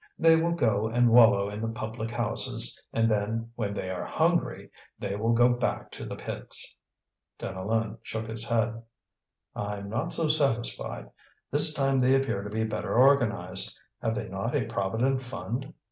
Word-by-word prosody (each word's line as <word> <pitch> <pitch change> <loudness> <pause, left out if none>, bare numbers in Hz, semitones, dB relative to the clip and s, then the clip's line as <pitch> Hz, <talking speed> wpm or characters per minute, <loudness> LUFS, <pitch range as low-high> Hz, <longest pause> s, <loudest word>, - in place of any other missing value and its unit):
They 165 0 +5
will 165 +1 +1
go 110 -9 +1
and 120 +1 +2
wallow 115 -4 +6
in 105 +1 -6
the 115 - -2
public 115 0 -5
houses, 120 -2 +3
and 115 0 +1
then, 110 +2 -2
when 110 -4 -3
they 95 - -4
are 90 - -4
hungry, - - -1 0.3
they 100 - -4
will 110 +3 0
go 120 +1 +4
back 120 0 -2
to - - -8
the - - -6
pits." - - -2 0.6
Deneulin 110 +4 -3
shook 110 -1 -5
his 110 0 -4
head: 115 -1 -1 0.7
"I'm 100 -1 -5
not 115 +1 -2
so 165 - -1
satisfied; 120 - -1 0.4
this 150 +2 +8
time 135 -2 +1
they 130 +1 +4
appear 135 -7 -1
to 105 - -7
be 110 +2 -2
better 110 +1 -3
organized. 125 -5 +3 0.2
Have - - -1
they - - -4
not - - -4
a - - 0
Provident 115 +7 -1
Fund?" 130 0 -6
115 Hz, 165 wpm, -27 LUFS, 105-125 Hz, 0.7 s, this